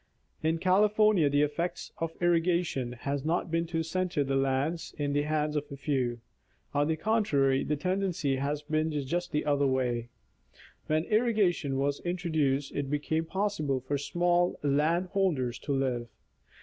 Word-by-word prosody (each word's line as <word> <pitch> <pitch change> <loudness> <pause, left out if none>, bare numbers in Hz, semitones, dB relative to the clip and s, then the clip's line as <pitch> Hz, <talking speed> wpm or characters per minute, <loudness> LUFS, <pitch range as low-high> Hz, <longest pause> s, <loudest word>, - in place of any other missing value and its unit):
In 160 +1 +1
California, 205 -1 +4
the 145 +1 +3
effect 170 +4 -2
of 165 0 -4
irrigation 170 -7 +1
has 140 +3 -3
not 165 +1 -1
been 165 0 0
to 165 -1 -1
center 175 -2 -1
the 135 0 -1
land 135 +5 0
in 145 -1 -1
the 145 - +2
hands 150 0 -1
of 150 0 -3
a 140 - -6
few. 130 -4 -1 0.5
On 145 0 +2
the 160 - +1
contrary, 155 -9 +2
the 150 - 0
tendency 175 -4 -1
has 145 +2 -2
been 155 +1 0 0.2
just 175 +6 -2
the 150 - -1
other 145 -1 +2
way. 125 -3 0 0.8
When 155 +1 +1
irrigation 205 - +1
was 140 +1 0
introduced 160 -6 0
it 140 -1 -3
became 155 +2 -1
possible 160 -8 -1
for 140 +3 -2
small 175 +4 +1
land 155 +6 +2
holders 150 - 0
to 145 - -5
live. 130 -3 0
150 Hz, 155 wpm, -29 LUFS, 140-175 Hz, 0.8 s, California